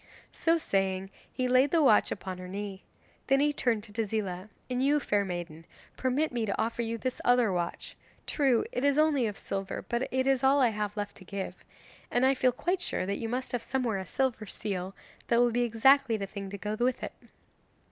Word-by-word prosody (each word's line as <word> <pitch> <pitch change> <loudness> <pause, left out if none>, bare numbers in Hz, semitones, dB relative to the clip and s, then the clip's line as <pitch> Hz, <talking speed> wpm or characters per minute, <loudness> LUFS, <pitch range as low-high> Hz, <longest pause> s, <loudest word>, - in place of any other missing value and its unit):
So 330 0 +2
saying 195 - -1 0.2
he 255 - -1
laid 255 +3 +4
the 325 +1 +3
watch 220 -6 +5
upon 185 -1 -5
her 180 - -7
knee. 195 0 -6 0.4
Then 270 0 +4
he 295 +1 +3
turned 235 -6 0
to 210 -2 -14
Tezila. 210 -3 -2 0.2
'And 255 0 -1
you 290 +2 +4
fair 205 -7 +1
maiden, 175 -4 -5 0.3
permit 265 +5 0
me 240 -2 -1
to 200 - -2
offer 230 +1 0
you 230 0 -2
this 255 +2 -3
other 245 -5 +4
watch. 175 -1 -3 0.3
True 265 -6 +2
it 250 - -2
is 285 0 +3
only 300 -6 +3
of 205 - -5
silver, 195 -1 -4
but 240 +2 -1
it 260 0 +1
is 270 -2 +2
all 275 +2 +5
I 250 -3 +5
have 210 -1 -3
left 205 0 -4
to - - -12
give. 195 +1 -5 0.6
And 245 +2 +2
I 265 - +5
feel 255 -1 +3
quite 355 +9 -1
sure 185 - -2
that 200 +1 -2
you 225 - -3
must 255 +2 -3
have 245 - -1
somewhere 235 -5 -1
a 190 - -6
silver 245 -3 -1
seal, 190 -2 -4 0.3
that 235 - +3
will 240 0 +4
be 240 +2 +1
exactly 240 +1 +4
the 200 - -3
thing 195 0 -7
to 200 - -6
go 210 +2 -3
with 250 +1 +1
it. - - -4
230 Hz, 215 wpm, -29 LUFS, 200-260 Hz, 0.6 s, watch